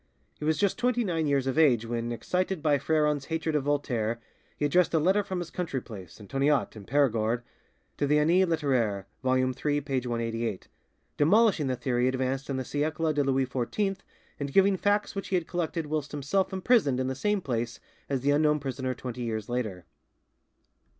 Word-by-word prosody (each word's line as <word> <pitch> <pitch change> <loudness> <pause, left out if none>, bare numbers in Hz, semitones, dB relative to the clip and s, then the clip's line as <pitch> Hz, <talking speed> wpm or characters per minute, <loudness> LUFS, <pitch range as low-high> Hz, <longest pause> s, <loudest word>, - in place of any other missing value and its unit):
He 150 - -4
was 155 0 +2
just 200 +3 +1
twenty 245 -1 +2
nine 165 -6 0
years 140 -2 +1
of 135 +3 0
age 125 -8 +4
when, 120 0 -3
excited 180 - -2
by 145 -2 +3
Freron's 150 -1 +1
hatred 160 -1 -2
of 145 -2 0
Voltaire, 120 -6 0 0.4
he 150 - 0
addressed 170 +3 +3
a - - +4
letter 190 +6 +3
from 190 -2 -4
his 175 -2 -5
country 165 -7 -2
place, 95 -8 -11
Antoniat, 135 +6 0
in 105 -2 -10
Perigord, 120 -4 +1 0.5
to 145 - 0
the 150 +1 +4
'Annee 170 +5 +4
Litteraire' 130 - 0 0.2
(vol. 130 -1 +2
iii. 130 +3 0
p. 135 -2 -1
188), 115 -3 -3 0.5
demolishing 185 0 +4
the 130 - 0
theory 125 0 0
advanced 130 +1 -1
in 135 - -1
the 130 - -3
'Siecle 155 +3 -1
de 145 -1 +2
Louis 135 -1 +1
XIV', 140 - -1 0.4
and 140 -1 -3
giving 195 +4 +5
facts 205 +2 +1
which 195 - -4
he 190 - 0
had 175 -2 0
collected 170 -1 -2
whilst 150 -1 -3
himself 150 +7 0
imprisoned 190 - +2
in 130 - 0
the 130 - -1
same 205 +10 0
place 120 -7 -3 0.3
as 135 -2 -1
the 140 +2 +2
unknown 150 +1 +3
prisoner 130 -2 -3
twenty 125 -1 -6
years 110 -2 -3
later. 110 -8 -3
140 Hz, 185 wpm, -28 LUFS, 125-160 Hz, 0.5 s, giving